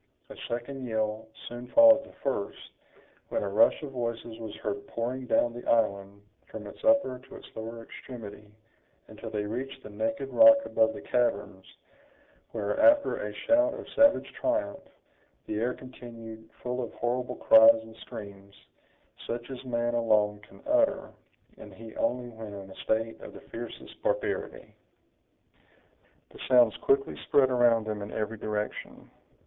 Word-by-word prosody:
A - - -8
second 125 +2 -5
yell 110 -1 -2 0.2
soon 120 +1 -7
followed 280 - +7
the - - -16
first, 115 -7 -3 0.6
when - - -1
a - - -2
rush 105 +8 +4
of 145 - -6
voices 115 -2 -4
was 110 -2 -7
heard 100 -1 -5
pouring 125 +2 -4
down 120 -1 +2
the 120 - -8
island, 100 -3 0 0.2
from 110 -1 -8
its 100 - -11
upper 275 - +3
to 130 - -14
its - - -11
lower 115 +1 -7
extremity, 105 -4 -10 0.6
until - - -8
they 105 -1 -2
reached 130 +5 -5
the 105 - -10
naked 115 +6 -2
rock 280 0 +9
above 110 0 +2
the 80 - -9
caverns, 95 -3 -1 0.8
where, 105 -2 -2
after 290 0 +5
a 105 - -4
shout 295 - +2
of - - -9
savage 285 0 +3
triumph, 300 -11 -1 0.7
the 105 - -3
air 125 +2 0
continued 115 -3 -11
full 125 +1 -2
of 120 - -5
horrible 125 +1 -2
cries 110 0 +7
and 110 0 -13
screams, 100 -1 -10 0.7
such 120 +2 -5
as 130 - -7
man 120 -1 -1
alone 105 -3 +2
can 105 - -18
utter, 295 -1 +2 0.5
and - - -12
he 115 -1 -11
only 125 0 -1
when 110 -3 -9
in 95 -1 -9
a - - -12
state 115 +1 -1
of - - -10
the - - -11
fiercest - - -9
barbarity. - - -2 1.6
The - - -14
sounds - - +5
quickly 410 0 +1
spread 130 -2 +4
around 120 -3 +4
them 105 -1 -4
in 100 - -6
every 110 0 -3
direction. 105 0 -5
115 Hz, 155 wpm, -28 LUFS, 110-130 Hz, 1.6 s, rock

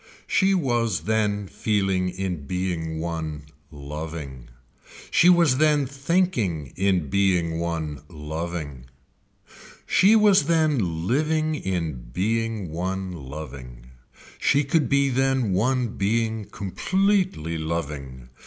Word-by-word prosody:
She 195 0 +3
was 120 - 0
then 105 +1 0
feeling 95 +1 0
in 90 -5 -4
being 85 -3 -2
one 80 -3 -4 0.2
loving, 75 -3 -7 0.6
she 175 - +6
was 170 -7 +5
then 150 -2 +4
thinking 135 - -1
in 90 -7 +1
being 90 -4 +2
one 80 -4 -3
loving. 80 -4 -5 1.0
She 205 +4 +5
was 205 -7 +5
then 140 - +1
living 155 - +1
in 85 - -3
being 110 - -1
one 95 +3 -3
loving. 65 -5 -9 0.5
She 145 - +3
could 150 +2 +1
be 140 0 +3
then 130 -4 +1
one 125 +5 +1
being 110 +1 0
completely 100 - 0
loving. 70 -6 -5
95 Hz, 105 wpm, -24 LUFS, 80-130 Hz, 1.0 s, she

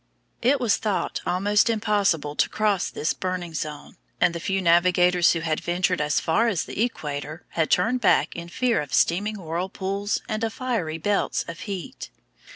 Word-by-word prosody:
It 265 +4 +3
was 235 -5 +2
thought 210 -3 -2
almost 205 +4 +2
impossible 200 -9 +1
to - - +2
cross 210 -4 0
this 155 - -1
burning 180 -2 -4
zone, 150 -1 -6 0.2
and 175 -1 +3
the 170 - -4
few 195 +3 -1
navigators 180 0 +4
who 165 - -2
had 160 -1 -1
ventured 180 0 0
as 150 -1 +1
far 215 +9 +2
as 200 -8 0
the - - -4
equator 155 -7 -4
had 160 -2 0
turned 230 +8 +2
back 210 - +3
in 170 0 -7
fear 245 +4 +1
of 140 -3 -3
steaming 205 +5 +2
whirlpools 190 +4 -2
and 215 +1 -3
of 225 -1 -1
fiery 220 -12 -2
belts 200 +5 0
of 170 0 -7
heat. 185 - -6
180 Hz, 170 wpm, -24 LUFS, 165-210 Hz, 0.2 s, navigators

